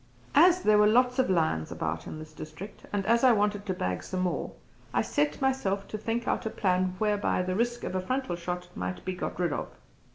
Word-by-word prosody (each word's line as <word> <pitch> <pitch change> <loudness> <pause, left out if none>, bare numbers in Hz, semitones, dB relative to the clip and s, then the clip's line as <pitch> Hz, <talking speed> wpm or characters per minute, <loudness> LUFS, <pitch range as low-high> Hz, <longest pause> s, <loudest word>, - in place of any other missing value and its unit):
As 350 +4 +6
there 215 0 +5
were 210 - +6
lots 250 +3 +3
of 260 - +3
lions 160 - +1
about - - -3
in - - -6
this 155 0 -10
district 160 +7 -9
and 200 -1 -1
as 235 +3 +3
I 255 -2 +7
wanted 205 -1 0
to 190 - 0
bag 90 - -2
some 185 -1 -3
more, 175 -5 -1 0.4
I - - +3
set 150 +1 0
myself 230 -8 0
to 215 - -4
think 230 +3 -2
out - - 0
a - - 0
plan 185 -3 0
whereby 205 -3 +1
the 185 0 -2
risk 240 +3 0
of - - -3
a 185 - 0
frontal 255 -2 -2
shot 180 +1 -4
might 185 - -4
be 185 - -1
got 180 - -5
rid 175 -4 +1
of. - - -3
195 Hz, 225 wpm, -28 LUFS, 180-230 Hz, 0.4 s, I